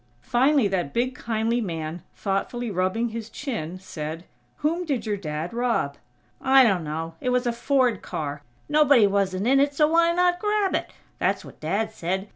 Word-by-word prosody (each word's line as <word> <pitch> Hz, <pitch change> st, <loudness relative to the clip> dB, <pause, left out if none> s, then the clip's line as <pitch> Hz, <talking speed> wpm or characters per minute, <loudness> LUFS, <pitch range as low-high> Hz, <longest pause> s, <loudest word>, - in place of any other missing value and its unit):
Finally 260 Hz, -, +3 dB
that 180 Hz, -7 st, -2 dB
big 250 Hz, +2 st, +1 dB
kindly 230 Hz, 0 st, -1 dB
man, 165 Hz, -3 st, -4 dB
thoughtfully 215 Hz, +4 st, -2 dB
rubbing 190 Hz, +6 st, 0 dB
his 225 Hz, 0 st, -6 dB
chin, 220 Hz, -, -4 dB
said: 165 Hz, -2 st, -6 dB, 0.3 s
"Whom 330 Hz, +4 st, -1 dB
did 280 Hz, -9 st, -2 dB
your 210 Hz, -1 st, 0 dB
Dad 160 Hz, -1 st, -4 dB
rob?" 235 Hz, -12 st, 0 dB, 0.5 s
"I 265 Hz, 0 st, +6 dB
dunno. 165 Hz, -6 st, 0 dB
It 250 Hz, -, 0 dB
was 250 Hz, 0 st, +1 dB
a 240 Hz, -, +1 dB
Ford 245 Hz, -2 st, +1 dB
car. 145 Hz, -1 st, -4 dB, 0.3 s
Nobody 295 Hz, -6 st, +5 dB
wasn't 195 Hz, -1 st, 0 dB
in 270 Hz, +3 st, +4 dB
it, 285 Hz, +1 st, +2 dB
so 300 Hz, +1 st, +4 dB
why 335 Hz, +1 st, +4 dB
not 355 Hz, 0 st, +2 dB
grab 420 Hz, -1 st, +1 dB
it? -, -, -1 dB, 0.3 s
That's -, -, 0 dB
what -, -, -13 dB
Dad 200 Hz, +8 st, -1 dB
said. 190 Hz, +4 st, -3 dB
225 Hz, 170 wpm, -25 LUFS, 185-270 Hz, 0.5 s, I